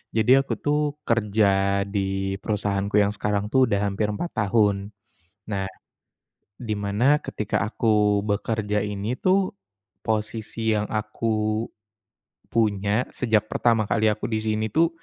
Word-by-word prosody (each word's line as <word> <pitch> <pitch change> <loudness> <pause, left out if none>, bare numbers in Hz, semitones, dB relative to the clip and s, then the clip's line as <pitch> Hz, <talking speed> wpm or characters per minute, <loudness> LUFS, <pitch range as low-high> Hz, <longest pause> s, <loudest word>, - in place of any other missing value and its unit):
jadi 110 +2 +3
aku - - -2
tuh 150 0 +1 0.2
kerja 100 -3 +2
di 95 -1 -2
perusahaanku 100 -1 -1
yang 100 - +1
sekarang 105 0 -1
tuh 130 -1 +5
udah 100 -3 +1
hampir 105 +2 -1
4 170 +11 -4
tahun, 100 -1 +1 0.6
nah 100 -2 -1 1.0
di 110 -3 -2
mana 105 +8 +2
ketika 105 - -2
aku 105 -2 +2
bekerja 105 0 -1
ini 105 +3 -3
tuh 185 +5 +1 0.5
posisi 110 0 -1
yang 105 - 0
aku 110 0 -1 0.9
punya 105 +1 +1
sejak 110 -4 +2
pertama 115 -1 +2
kali 110 0 +2
aku 105 - -4
di 110 -1 -1
sini 110 0 0
tuh 165 +1 +4
105 Hz, 130 wpm, -24 LUFS, 100-115 Hz, 1.0 s, tuh